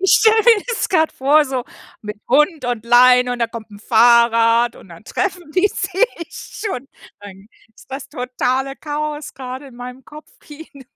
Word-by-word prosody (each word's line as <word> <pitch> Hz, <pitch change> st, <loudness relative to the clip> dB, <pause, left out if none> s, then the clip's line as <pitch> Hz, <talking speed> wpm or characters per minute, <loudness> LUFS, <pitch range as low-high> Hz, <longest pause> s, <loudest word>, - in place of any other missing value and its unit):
Ich 385 Hz, -, +3 dB
stelle 440 Hz, 0 st, +4 dB
mir 455 Hz, -4 st, +5 dB
das 480 Hz, -2 st, -2 dB
gerade 320 Hz, -4 st, +1 dB
vor 290 Hz, +3 st, +3 dB
so 260 Hz, -3 st, -4 dB, 0.4 s
mit 210 Hz, 0 st, -7 dB
Hund 300 Hz, +2 st, +2 dB
und 240 Hz, -2 st, -3 dB
Leine 250 Hz, +1 st, +5 dB
und 245 Hz, -, -5 dB
da 235 Hz, -, +1 dB
kommt 225 Hz, -1 st, -10 dB
'n 205 Hz, -, -13 dB
Fahrrad 230 Hz, +1 st, +3 dB
und -, -, -16 dB
dann 170 Hz, +4 st, -14 dB
treffen 360 Hz, -, -4 dB
die 375 Hz, +3 st, +2 dB
sich 365 Hz, -2 st, -2 dB, 0.3 s
schon. 275 Hz, -, -4 dB, 0.3 s
Dann 200 Hz, 0 st, -13 dB, 0.3 s
ist -, -, -20 dB
das 270 Hz, +2 st, -7 dB
totale 255 Hz, +2 st, -2 dB
Chaos 300 Hz, 0 st, -5 dB
gerade 260 Hz, +1 st, -8 dB
in 255 Hz, -3 st, -15 dB
meinem 250 Hz, +1 st, -10 dB
Kopfkino. 300 Hz, 0 st, -14 dB
260 Hz, 170 wpm, -18 LUFS, 240-310 Hz, 0.4 s, mir